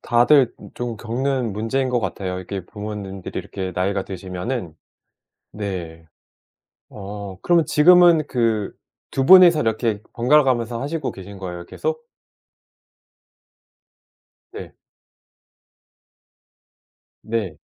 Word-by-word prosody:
다들 125 Hz, +2 st, +4 dB, 0.2 s
좀 120 Hz, -2 st, -4 dB
겪는 120 Hz, +1 st, -2 dB
문제인 130 Hz, +6 st, -1 dB
것 125 Hz, -1 st, 0 dB
같아요, 95 Hz, -2 st, -4 dB
이게 95 Hz, 0 st, -6 dB
부모님들이 105 Hz, -2 st, -7 dB
이렇게 95 Hz, -2 st, -5 dB
나이가 95 Hz, +1 st, -1 dB
드시면은. 95 Hz, 0 st, -5 dB, 0.8 s
네. 85 Hz, -6 st, -6 dB, 0.9 s
어 100 Hz, -1 st, -8 dB
그러면 170 Hz, -2 st, +3 dB
지금은 170 Hz, 0 st, +6 dB
그 115 Hz, -4 st, 0 dB, 0.4 s
2 135 Hz, -, -1 dB
분이서 180 Hz, -3 st, +8 dB
이렇게 110 Hz, -2 st, -1 dB
번갈아가면서 120 Hz, -3 st, +2 dB
하시고 155 Hz, +3 st, -3 dB
계신 100 Hz, +1 st, -11 dB
거예요 90 Hz, -2 st, -7 dB
계속? 475 Hz, 0 st, -4 dB, 2.5 s
네. -, -, -9 dB, 2.5 s
네. 110 Hz, -8 st, -3 dB
110 Hz, 210 characters per minute, -21 LUFS, 95-130 Hz, 2.5 s, 분이서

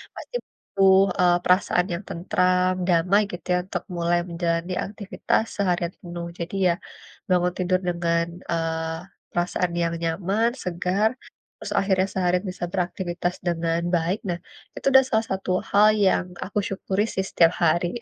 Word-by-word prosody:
pasti -, -, -9 dB
butuh, 190 Hz, -1 st, +3 dB, 0.2 s
eee, 175 Hz, -1 st, +5 dB
perasaan 180 Hz, -1 st, +3 dB
yang 170 Hz, -, -3 dB
tentram, 180 Hz, 0 st, +1 dB
damai 180 Hz, +4 st, +4 dB
gitu 175 Hz, -2 st, -8 dB
ya -, -, +3 dB
untuk 190 Hz, -, -4 dB
mulai 170 Hz, 0 st, +2 dB
menjalani 170 Hz, +1 st, -1 dB
aktivitas 205 Hz, +1 st, -1 dB
seharian 180 Hz, -3 st, 0 dB
penuh. 170 Hz, -1 st, -6 dB
Jadi 170 Hz, +3 st, -4 dB
ya, -, -, +4 dB, 0.6 s
bangun 180 Hz, -1 st, +2 dB
tidur 185 Hz, 0 st, +2 dB
dengan, 170 Hz, -1 st, +1 dB, 0.3 s
eee, 165 Hz, -1 st, -1 dB, 0.3 s
perasaan 175 Hz, 0 st, 0 dB
yang 170 Hz, 0 st, 0 dB
nyaman, 195 Hz, +8 st, +1 dB
segar, 180 Hz, +5 st, +1 dB, 0.5 s
terus -, -, -4 dB
akhirnya 190 Hz, -1 st, +2 dB
seharian 180 Hz, -1 st, +1 dB
bisa 180 Hz, -1 st, -4 dB
beraktifitas 175 Hz, -1 st, -2 dB
dengan 165 Hz, 0 st, 0 dB
baik. 175 Hz, +5 st, 0 dB
Nah, 175 Hz, 0 st, -2 dB, 0.4 s
itu -, -, -9 dB
udah 265 Hz, 0 st, +8 dB
salah 220 Hz, -1 st, +1 dB
satu 190 Hz, -1 st, -2 dB, 0.2 s
hal 205 Hz, +1 st, +6 dB, 0.2 s
yang 185 Hz, -, +2 dB, 0.2 s
aku 205 Hz, -, -6 dB
syukuri 195 Hz, +1 st, -1 dB
sih 190 Hz, -, -2 dB
setiap 165 Hz, 0 st, +4 dB
hari. 175 Hz, +6 st, +1 dB
180 Hz, 145 wpm, -24 LUFS, 170-190 Hz, 0.6 s, udah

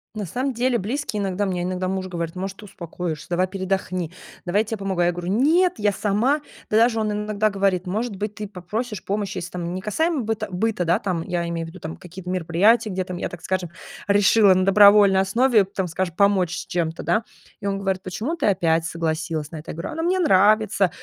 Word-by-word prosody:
На 210 Hz, -1 st, -3 dB
самом 255 Hz, +9 st, -2 dB
деле 245 Hz, 0 st, +1 dB
близкие, 220 Hz, +1 st, -3 dB
иногда 195 Hz, +1 st, -1 dB
мне 185 Hz, -2 st, -2 dB
иногда 185 Hz, +1 st, -2 dB
муж 190 Hz, 0 st, -2 dB
говорит: 170 Hz, -2 st, -4 dB
"Может, 190 Hz, +1 st, -5 dB
ты 215 Hz, -, -11 dB
успокоишься? 170 Hz, -4 st, -6 dB
Давай 175 Hz, +1 st, +2 dB
передохни, 185 Hz, -3 st, -2 dB, 0.3 s
давай 190 Hz, +4 st, +1 dB
я -, -, -3 dB
тебе 225 Hz, 0 st, -4 dB
помогу". 195 Hz, -3 st, -2 dB
Я 175 Hz, 0 st, +3 dB
говорю: 175 Hz, +1 st, -4 dB
"Нет, 325 Hz, -, +3 dB
я 210 Hz, -1 st, +2 dB
сама". 215 Hz, +9 st, +1 dB, 0.3 s
Да 215 Hz, -, +4 dB
даже 230 Hz, 0 st, +4 dB
он 215 Hz, -1 st, 0 dB
иногда 210 Hz, 0 st, 0 dB
говорит: 195 Hz, -2 st, +1 dB
"Может 210 Hz, +4 st, -2 dB
быть, 205 Hz, +2 st, -4 dB
ты 210 Hz, 0 st, -6 dB
попросишь 210 Hz, +2 st, -5 dB
помощи?"- 200 Hz, -1 st, -2 dB
если 175 Hz, -1 st, -5 dB
там 175 Hz, -1 st, -4 dB
не 185 Hz, -, -4 dB
касаемо 315 Hz, -, 0 dB
быт 220 Hz, -1 st, -2 dB
быта, 200 Hz, +1 st, -1 dB
да, 175 Hz, +1 st, +3 dB
там, 180 Hz, -4 st, -2 dB
я 170 Hz, 0 st, -2 dB
имею 165 Hz, -1 st, -3 dB
в -, -, -8 dB
виду 185 Hz, +3 st, -12 dB, 0.2 s
какие-то 180 Hz, +1 st, -11 dB
мероприятия, 185 Hz, +6 st, +2 dB
где 185 Hz, -1 st, -2 dB
там 180 Hz, -1 st, -6 dB
я, -, -, -3 dB
так 175 Hz, -, -10 dB
скажем, 185 Hz, -2 st, -2 dB, 0.4 s
решила 205 Hz, 0 st, +5 dB
на 185 Hz, 0 st, +2 dB
добровольной 200 Hz, -1 st, +7 dB
основе, 220 Hz, +3 st, +3 dB
там, 190 Hz, 0 st, -3 dB
скажем, 175 Hz, 0 st, -3 dB
помочь 190 Hz, -4 st, +2 dB
с -, -, -5 dB
чем-то, 165 Hz, -2 st, -2 dB
да. 225 Hz, -, +1 dB, 0.4 s
И 200 Hz, -, -3 dB
он 195 Hz, 0 st, -1 dB
говорит: 190 Hz, -1 st, -1 dB
"Почему 215 Hz, -, -3 dB
ты 335 Hz, -, 0 dB
опять 165 Hz, -5 st, +2 dB
согласилась 160 Hz, -2 st, -2 dB
на 165 Hz, -, -6 dB
это?" 155 Hz, -, -8 dB
Я -, -, -9 dB
говорю: 170 Hz, -, -4 dB
"А, -, -, -7 dB
ну, 325 Hz, -, -2 dB
мне 360 Hz, +2 st, +2 dB
нравится". 210 Hz, -, +4 dB
195 Hz, 220 wpm, -23 LUFS, 180-215 Hz, 0.4 s, добровольной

